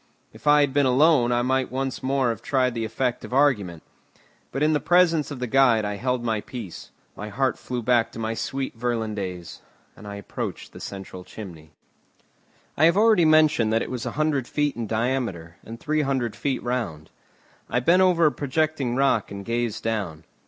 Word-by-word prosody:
If - - -12
I 150 0 +6
had 140 -2 +1
been 140 -1 +3
alone 130 -1 +4
I 120 0 +2
might 130 +1 +1
have - - -23
once 135 0 -3
more 130 -2 +1
tried 130 +3 0
the 115 -1 -2
effect 120 +3 -2
of - - -8
argument; 105 - +1 0.7
but 135 - -1
in 155 +1 +3
the 150 - +2
presence 170 -3 +3
of 145 - -6
the 125 - -3
guide 120 -3 +3
I 105 0 -3
held 125 +1 -1
my 110 -3 -1
peace; 110 -8 -8 0.3
my 105 - -7
heart 130 +5 0
flew 125 -2 -4
back 120 -1 +2
to - - -9
my 115 0 -2
sweet 135 +3 -4
Virlandaise, 105 -7 -4 0.3
and 105 - -12
I 100 - -6
approached 100 -2 -6
the - - -10
central 95 -2 -8
chimney. 85 -7 -10 1.1
I 155 - +4
have 170 +3 +4
already 215 -5 +5
mentioned 155 -8 +4
that 115 - +2
it - - -7
was 125 -3 -4
a - - -4
hundred 150 -5 0
feet 145 -2 -1
in 115 -2 -4
diameter, 110 -8 -2
and 115 +1 -9
three 155 0 0
hundred 130 -5 -1
feet 135 -3 -2
round. 110 -12 -3 0.6
I 125 - +1
bent 170 +9 +4
over 180 -3 +4
a 150 - +5
projecting 145 -3 -1
rock 135 -5 +2
and 100 0 -8
gazed 115 -1 -2
down. 100 -9 -3
125 Hz, 195 wpm, -24 LUFS, 110-140 Hz, 1.1 s, I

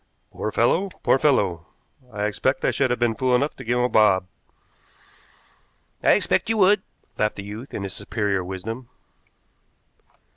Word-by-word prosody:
"Poor 110 - -4
fellow. 170 - +2
Poor 135 - +3
fellow! 100 - +1 0.4
I 105 -1 -4
expect 120 +6 0
I - - +3
should 135 -2 +1
have 125 - 0
been 120 -1 +1
fool 125 +2 +1
enough 140 +4 0
to 125 - -8
give 120 +1 0
him 125 - +2
a - - +3
bob." 100 -6 +3 1.8
"I - - +5
expect 95 - +1
you 225 - +1
would," 200 0 +5 0.4
laughed 105 0 +1
the 100 - -7
youth, 105 +6 -8
in 100 - -5
his 95 -1 -5
superior 100 -4 -2
wisdom. 110 +7 -6
115 Hz, 160 wpm, -23 LUFS, 100-130 Hz, 1.8 s, I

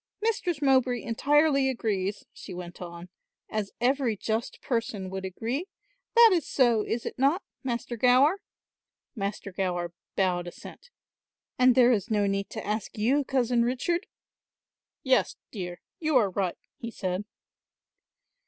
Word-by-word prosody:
"Mistress 360 -9 -1
Mowbray 260 -3 +3
entirely 275 +3 +3
agrees," 205 -5 -2
she 185 - -9
went 175 0 -8
on, 170 0 -8 0.4
"as 215 -2 -2
every 250 -2 +1
just 220 +3 -2
person 220 -6 -2
would 190 0 -4
agree. 235 - -3 0.5
That 465 -1 +9
is 335 -5 0
so, 240 -5 +3
is 230 +2 -3
it - - -5
not, 285 +9 +3 0.2
Master 240 -1 -3
Gower?" 255 - +4 0.8
Master 200 -1 -4
Gower 175 -2 -2 0.2
bowed 180 -2 +1
assent. - - -11 0.7
"And 255 -1 +6
there 250 -1 +6
is 220 -1 0
no 210 -2 +2
need 195 0 -1
to 220 - -6
ask 210 0 -3
you, 260 +7 +2
Cousin 245 -3 +1
Richard." 260 +9 -1 1.0
"Yes, 260 -1 +2 0.2
dear, 175 -4 -6 0.2
you 310 -4 +3
are 205 -6 +3
right," 185 -2 -1 0.2
he 235 - -5
said. 185 -3 -3
235 Hz, 135 wpm, -28 LUFS, 195-265 Hz, 1.0 s, That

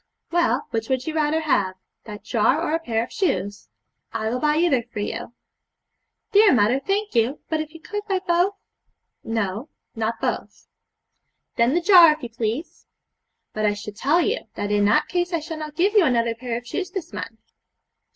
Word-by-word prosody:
'Well, 345 0 +1
which 225 -1 -3
would 260 -1 0
you 315 - -3
rather 310 0 +1
have 200 -12 +1 0.3
that 210 -2 -9
jar 230 +5 +2
or 325 -1 -1
a 325 - +1
pair 230 -8 -1
of - - -10
shoes? 200 - -2 0.4
I 220 -1 -2
will 250 - -1
buy 300 +2 +2
either 320 -7 +3
for - - -10
you.' 210 +3 -4 1.0
'Dear 415 -6 +6
mother, 225 +4 +3
thank 400 +8 -2
you! 235 +5 +1
but 315 0 0
if 310 0 -7
you 325 - -12
could 415 +3 -4
buy 390 -2 +1
both?' 365 +2 +1 0.7
'No, 225 +3 -3 0.3
not 225 +1 -2
both.' - - -4 0.9
'Then 235 +5 +3
the 350 - +2
jar, 345 -3 +8
if 305 -2 -12
you 240 - -4
please.' 230 +7 -4 0.7
'But 215 0 0
I 205 - +1
should 205 0 -8
tell 300 +10 +2
you, 435 +7 0 0.2
that 205 - -3
in 205 0 +3
that 205 - +3
case 355 0 -1
I 335 - +1
shall 315 +1 -7
not 305 -1 -7
give 380 +5 +2
you 415 -4 +6
another 235 -5 +2
pair 230 0 -4
of 240 - -9
shoes 365 +10 -4
this 370 -4 -6
month.' 225 - -6
280 Hz, 190 wpm, -23 LUFS, 225-340 Hz, 1.0 s, jar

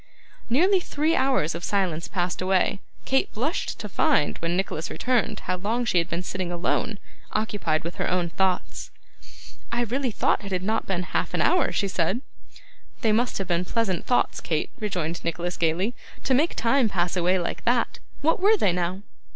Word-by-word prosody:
Nearly 365 - +4
three 315 -1 0
hours 260 - +2
of 170 - -6
silence 180 -5 0
passed 180 -2 -2
away. 190 +1 +2 0.3
Kate 265 0 +1
blushed 280 +10 -1
to 210 - -4
find, 150 -6 +2
when 170 +1 -1
Nicholas 180 -4 -2
returned, 250 -3 0
how 185 - -2
long 225 +6 -1
she 180 -6 +3
had 170 - -2
been 170 +2 -2
sitting 185 -1 -3
alone, 180 +5 -1 0.4
occupied 205 -7 0
with 170 +2 -6
her - - 0
own 180 -1 +1
thoughts. 185 +2 -1 0.8
'I 235 +1 +1
really 255 +3 -1
thought 215 - +1
it 200 - -7
had 185 -1 -1
not 220 +3 0
been 185 -2 -1
half - - -2
an - - +1
hour,' 360 - +3
she 200 - 0
said. 190 +5 0 0.8
'They 225 -4 +3
must 235 +3 +1
have 195 - -3
been 175 0 +1
pleasant 195 -2 -1
thoughts, 245 - +2
Kate,' 155 -2 -1
rejoined 180 -5 -2
Nicholas 175 +1 -2
gaily, 170 +7 +1 0.3
'to 265 - +2
make 300 +6 +2
time 235 0 +3
pass 175 -2 0
away 180 +1 +3
like 175 - -3
that. 240 -1 +1 0.2
What 325 +2 +3
were 420 +4 +5
they 195 - +3
now? 180 +2 -2
195 Hz, 185 wpm, -25 LUFS, 175-240 Hz, 0.8 s, were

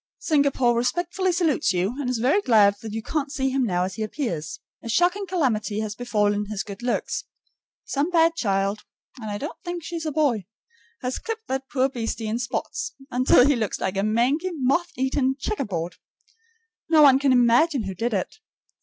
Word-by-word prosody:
Singapore 280 -6 +2
respectfully 350 +9 0
salutes 325 - +1
you, 185 +5 0
and 255 - -2
is 250 - 0
very 265 - +2
glad 215 - +5
that 220 - -6
you 220 +1 -4
can't 290 +1 -2
see 270 -2 -1
him 260 -4 +1
as 180 +1 0
he 220 - -6
now - - +1
appears. 225 - -4 0.2
A 230 - -7
shocking 360 - +2
calamity 235 - 0
has 215 -1 -3
befallen 210 -3 0
his 210 -2 -3
good 200 +1 -9
looks. 245 0 -2 0.6
Some 290 +4 -1
bad 330 -1 +4
child 200 -7 -1 0.3
and 220 -3 -6
I 205 - -3
don't 290 +8 -7
think 350 -2 -5
she's 330 -1 -4
a - - -1
boy 265 - +1 0.6
has 250 +1 -2
clipped 450 0 -5
that 265 0 -3
poor 265 -1 +2
beastie 230 -3 -4
in 220 +2 -2
spots, 245 +7 -3 0.2
until 250 0 +5
he 285 0 +4
looks 220 -4 -2
like 190 - -2
a 195 - +1
mangy, 245 - +1
moth 325 +3 0
eaten 265 0 +1
checkerboard. 190 - -3 0.9
No 315 -2 +6
one 270 -2 +7
can 275 -1 +2
imagine 250 +3 +4
who 190 -1 -4
did 225 +4 -1
it. 190 - -3
250 Hz, 185 wpm, -24 LUFS, 215-305 Hz, 0.9 s, one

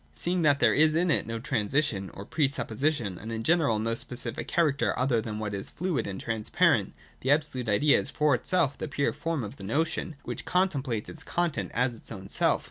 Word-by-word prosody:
237.] - - -9
Seeing 175 +1 +1
that 145 -3 +4
there - - +5
is 155 +1 +4
in 170 +1 +2
it - - +1
no 115 0 -3
transition, 110 -3 0
or 100 - -8
pre 150 +4 +1
supposition, 120 - -1
and 110 +2 -7
in 115 0 -3
general 150 -6 +3
no 115 +2 -1
specific 120 0 -2
character 150 -5 +1
other 125 -3 +2
than 110 -1 -5
what 105 -1 -3
is 100 -1 -4
fluid 180 -3 -2
and 95 -1 -5
transparent, 110 -2 +1 0.3
the 130 - -3
Absolute 140 -5 +1
Idea 140 +8 +4
is - - -4
for 150 -2 +2
itself 145 +4 +1
the - - -3
pure 140 -1 0
form 165 -5 -2
of 105 - -7
the 100 - -10
notion, 155 - -1
which - - -5
contem 180 -6 +1
plates 115 -6 -3
its 160 - -6
content 170 -1 -1
as 125 +1 +2
its - - -11
own 95 0 -7
self. - - +2
135 Hz, 215 wpm, -28 LUFS, 110-155 Hz, 0.3 s, there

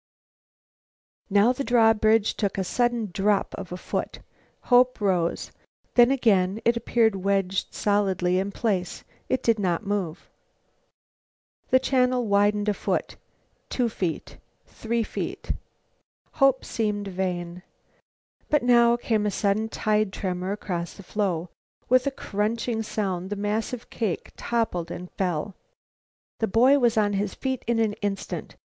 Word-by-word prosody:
Now 205 +5 +4
the 275 - -3
drawbridge 225 -3 +4
took 200 -3 -2
a 190 - 0
sudden 240 0 0
drop 200 +1 +1
of 190 -3 -8
a 180 - -4
foot. - - -4 0.5
Hope 250 +1 +4
rose. 180 -5 0 0.4
Then, 240 0 +6
again, 210 -7 +2
it 235 - +4
appeared 230 -2 +2
wedged 195 0 0
solidly 190 -3 +1
in 195 +1 -2
place. 195 -5 -2 0.3
It 260 - 0
did 230 -2 +2
not 185 0 0
move. 195 -4 -3 1.4
The 260 - +6
channel 255 -2 +1
widened 205 0 +2
a 210 - +3
foot, - - -2 0.5
two 245 -2 0
feet, 180 -6 -4 0.3
three. 230 0 -2 1.3
Hope 275 -3 +3
seemed 210 -3 -2
vain. 180 -2 -3 0.9
But 295 -3 +2
now 235 -1 +5
came 220 -3 0
a - - +2
sudden 210 +2 0
tide 215 -2 0
tremor 185 -1 -3
across 175 -4 -4
the 200 - -12
floe. 180 -4 -2 0.4
With 255 +2 +4
a - - +1
crunching 225 0 -2
sound 190 -4 -3
the 205 - -2
massive 215 +4 -3
cake 210 -8 -3
toppled 220 -8 -1
and 180 +1 -7
fell. 180 0 -2 0.9
The 225 - +1
boy 255 +7 +5
was 235 -3 +2
on 205 -1 +2
his 200 -1 -2
feet 260 -2 -3
in 235 -1 +1
an 220 -2 +1
instant. 200 -2 -4
210 Hz, 135 wpm, -25 LUFS, 190-235 Hz, 1.4 s, Then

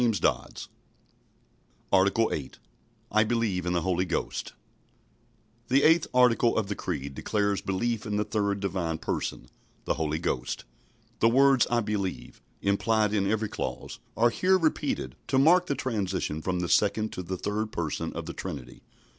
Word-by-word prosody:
ARTICLE 100 +4 +4
8 70 -4 -5 0.5
I 110 +1 +4
believe 110 -6 0
in 90 - +1
the 85 -2 0
Holy 90 0 +1
Ghost - - -3 1.1
The 135 +3 +3
eighth 165 +1 +5
article 125 -2 +4
of 105 -3 0
the 100 - -2
Creed 70 -5 -4
declares 100 +5 0
belief 110 +4 -2
in 105 - -2
the 105 - +2
third 100 -2 -1
Divine 90 -5 -2
Person - - -3 0.4
the - - +1
Holy 80 -1 -1
Ghost. 85 - -2 0.6
The 115 - +5
words 135 +1 +5
"I 120 -1 +2
believe," 100 -3 -4 0.2
implied 105 +1 +2
in 100 -2 +1
every 110 0 0
clause, - - -5 0.2
are 120 +1 +4
here 190 +8 +3
repeated, 155 - -1
to 130 - +1
mark 175 +6 +5
the 140 - 0
transition 95 - -2
from 90 +1 -1
the 90 - -1
Second 110 +1 +2
to - - -4
the 90 +1 -4
Third 105 +3 -2
Person 85 -6 -3
of - - -5
the - - -6
Trinity. - - -7
105 Hz, 155 wpm, -27 LUFS, 90-115 Hz, 1.1 s, eighth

